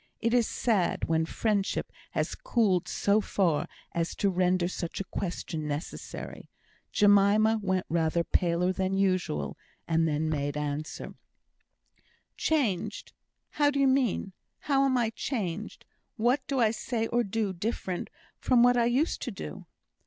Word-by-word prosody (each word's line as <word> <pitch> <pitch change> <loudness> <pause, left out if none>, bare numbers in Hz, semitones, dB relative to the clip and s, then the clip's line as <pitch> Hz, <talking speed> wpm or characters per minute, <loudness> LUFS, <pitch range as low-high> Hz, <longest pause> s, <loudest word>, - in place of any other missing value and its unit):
It 230 0 0
is 240 -2 +4
sad 205 -8 0
when 160 0 +1
friendship 205 -1 -1 0.2
has - - -1
cooled 195 -7 +1
so 205 +2 +2
far 175 -7 +1 0.2
as 170 0 -2
to 200 - +1
render 180 -1 +2
such 175 -2 -4
a - - -1
question 170 -5 -4
necessary. 150 +3 -6 0.4
Jemima 210 +1 +5
went 185 -2 0
rather 165 0 +1
paler 180 +1 +1
than 190 +1 -1
usual, 185 -5 0 0.3
and 165 0 +2
then 155 +1 0
made 145 -2 -1
answer: 150 +1 -4 1.2
"Changed! 220 - -1 0.4
How 290 -1 +3
do 285 -1 -1
you 275 - +5
mean? 255 -7 +1 0.3
How 275 -1 +2
am 260 -2 +2
I 230 -2 +1
changed? 215 - -4 0.3
What 240 +5 +2
do 275 -3 0
I 225 -3 +4
say 225 0 -2
or 240 +1 +1
do 210 -1 -1
different 185 -1 -3 0.3
from 245 -2 +4
what 245 0 +5
I 235 - +4
used 255 +7 +1
to - - -3
do?" 75 - -8
195 Hz, 145 wpm, -29 LUFS, 170-235 Hz, 1.2 s, Jemima